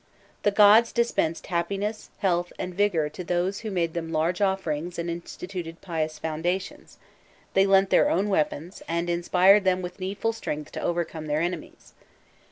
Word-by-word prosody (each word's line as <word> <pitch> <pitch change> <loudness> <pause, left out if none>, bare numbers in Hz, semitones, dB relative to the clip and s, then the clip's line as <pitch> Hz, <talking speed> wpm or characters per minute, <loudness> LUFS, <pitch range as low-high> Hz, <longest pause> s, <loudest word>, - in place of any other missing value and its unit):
The - - +3
gods 210 +3 +6
dispensed 235 -9 0
happiness, 200 +5 -2
health, 175 -2 0
and 180 - -4
vigour;* 180 -5 +1
to 165 +4 -7
those 180 +3 -1
who 220 - -5
made 170 -4 -1
them 165 -1 -4
large 165 +4 0
offerings 180 -4 -1
and 170 0 -2
instituted 170 0 -7
pious 160 -3 -3
foundations, 175 - -3 0.6
they 195 +1 +4
lent 195 0 +4
their - - +5
own 195 +4 +1
weapons, 170 -1 -1
and 170 +1 -1
inspired 185 +4 +4
them 185 -1 +1
with 180 +2 -7
needful 200 +4 -2
strength 150 -9 -5
to - - -5
overcome 170 -2 -2
their 150 +1 0
enemies. 175 -2 -5
180 Hz, 160 wpm, -26 LUFS, 165-195 Hz, 0.6 s, gods